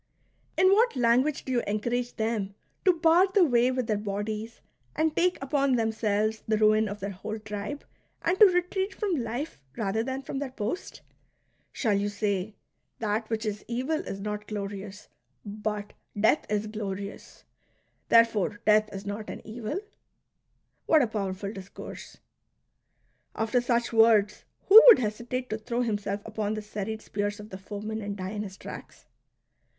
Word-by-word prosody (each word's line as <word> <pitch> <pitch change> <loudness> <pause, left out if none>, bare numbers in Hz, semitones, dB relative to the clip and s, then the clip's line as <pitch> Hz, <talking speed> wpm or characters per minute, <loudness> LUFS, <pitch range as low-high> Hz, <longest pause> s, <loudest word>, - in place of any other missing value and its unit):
In 375 +1 +6
what 460 0 +3
language 255 +4 +2
do 260 - -4
you 245 -2 +2
en 210 +1 0
courage 245 +2 -2
them 220 -3 -2 0.3
to 370 - +7
bar 335 +2 +4
the 375 -1 +4
way 245 -3 +3
with 255 -1 -1
their 215 -2 0
bodies 210 +2 -4 0.4
and 315 0 +1
take 360 +1 +2
upon 275 -1 +2
themselves 220 -1 0
the 215 0 +2
ruin 215 0 +4
of 205 +1 -7
their 200 +1 -3
whole 195 +3 -6
tribe, 210 +6 -6 0.4
and 355 +3 +1
to 425 - +10
retreat 370 +2 0
from 395 -6 -1
life 235 - -5 0.2
rather 215 0 0
than 265 +3 -4
from 270 - -4
their 280 -1 -3
post 250 - -5 0.3
.'' - - -44
Shall 220 -5 0
jfou 205 +1 0
say: 205 -1 -2 0.2
" - - -50
That 215 0 -2
which 225 0 -2
is 210 -1 -3
evil 260 +7 -1
is 195 - -6
not 210 +1 -4
glorious; 200 -1 -6 0.4
but 210 0 -4 0.3
death 220 +8 +3
is 210 0 0
glorious; 205 -2 -6 0.7
therefore 225 -3 +4
death 215 0 +4
is 195 0 -7
not 205 +1 -5
an - - -8
evil 235 - -4 0.4
" - - -51
.'' - - -47
What 315 -3 +5
a - - +1
powerful 200 -2 -3
discourse! 195 -1 -10 1.2
After 225 +2 +1
such 240 -1 0
words, 220 -2 +4 0.2
who 435 +3 +11
would 475 - +11
hesitate 240 +3 -3
to 215 - -2
throw 235 +2 -2
himself 205 -3 -2
upon 215 -1 -2
the 215 - -5
serried 215 +1 -5
spears 205 +1 -3
of 210 +1 -10
the 190 - -7
foemen, 210 +3 -5
and 200 0 -5
die 185 0 -4
in 210 -1 -3
his 195 -2 -7
tracks - - -10
220 Hz, 170 wpm, -28 LUFS, 205-250 Hz, 1.2 s, who